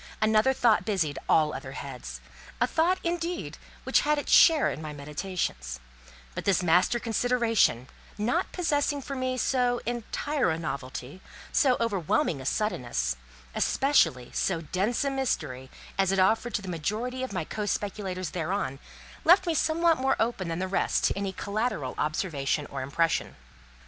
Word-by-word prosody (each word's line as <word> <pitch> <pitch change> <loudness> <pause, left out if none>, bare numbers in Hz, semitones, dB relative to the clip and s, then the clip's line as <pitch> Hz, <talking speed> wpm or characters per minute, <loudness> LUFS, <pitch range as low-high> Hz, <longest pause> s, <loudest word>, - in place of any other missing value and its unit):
Another 215 +3 +4
thought 230 -8 +3
busied 175 -8 -1
all 155 -1 +4
other 135 - -7
heads; 125 - -7 0.4
a 240 - +4
thought, 330 +8 +2
indeed, 345 0 -3 0.2
which - - +3
had 300 0 +1
its 290 - -3
share 320 -3 +6
in - - -6
my 155 -1 -6
meditations; 145 - -4 0.5
but - - -5
this 190 -2 +2
master 180 +7 +3
consideration, 230 - +1 0.3
not 245 - 0
possessing 290 -4 0
for 275 - -5
me 255 -1 -1
so 245 -1 +1
entire 245 - -1
a 160 - 0
novelty, 140 0 -6 0.3
so 260 -4 +3
overwhelming 185 -9 0
a 130 - -5
suddenness, 120 - -1 0.4
especially 130 - +2
so 170 -4 0
dense 190 - -1
a 275 - +1
mystery, 155 - -2 0.3
as 195 -1 +3
it 195 - +1
offered 225 +5 +2
to 205 - -2
the - - -8
majority 215 +10 -3
of 260 - -3
my 180 -4 -2
co 210 +4 -4
speculators 190 -4 -3
thereon, 170 -5 -2 0.4
left 370 +3 +6
me 340 - +1
somewhat 325 0 +2
more 265 +1 +2
open 225 -5 0
than 165 0 -2
the 185 +1 -2
rest 190 - 0
to - - +3
any 200 -1 -2
collateral 200 - -2
observation 150 -2 -1
or 135 - -4
impression. 160 +5 0
200 Hz, 155 wpm, -27 LUFS, 155-250 Hz, 0.5 s, share